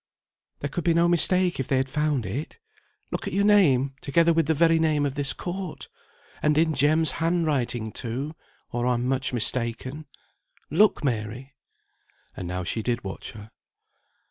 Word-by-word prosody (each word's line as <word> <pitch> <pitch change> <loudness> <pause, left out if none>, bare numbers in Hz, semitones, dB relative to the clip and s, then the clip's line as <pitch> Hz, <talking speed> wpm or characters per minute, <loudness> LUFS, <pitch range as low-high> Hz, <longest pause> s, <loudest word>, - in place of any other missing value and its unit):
"There 145 - -2
could 175 - -3
be 170 -1 +2
no 170 +1 +4
mistake 175 0 +3
if 135 - -2
they 135 - +1
had 130 +1 0
found 145 -3 -1
it. 130 - -5 0.5
Look - - -4
at - - -4
your 200 +1 +2
name, 140 -11 +4
together 170 +4 +3
with 165 -2 +1
the 160 - +2
very 165 +1 +4
name 155 -2 +2
of 140 - -2
this 140 -1 0
court! 175 -7 -6 0.5
And 150 0 +2
in 160 0 +3
Jem's 150 +3 +3
hand 170 +1 +1
writing 120 -7 -1
too, 130 +8 -4 0.4
or 120 +1 -1
I'm 125 -1 0
much 130 0 +1
mistaken. 125 +5 -1 0.6
Look, 200 +4 +3
Mary!" 120 +1 -3 0.8
And 90 - -6
now 90 +1 -3
she 110 +6 -2
did 120 +1 -2
watch 95 -1 -7
her. 105 0 -12
145 Hz, 170 wpm, -25 LUFS, 125-165 Hz, 0.8 s, no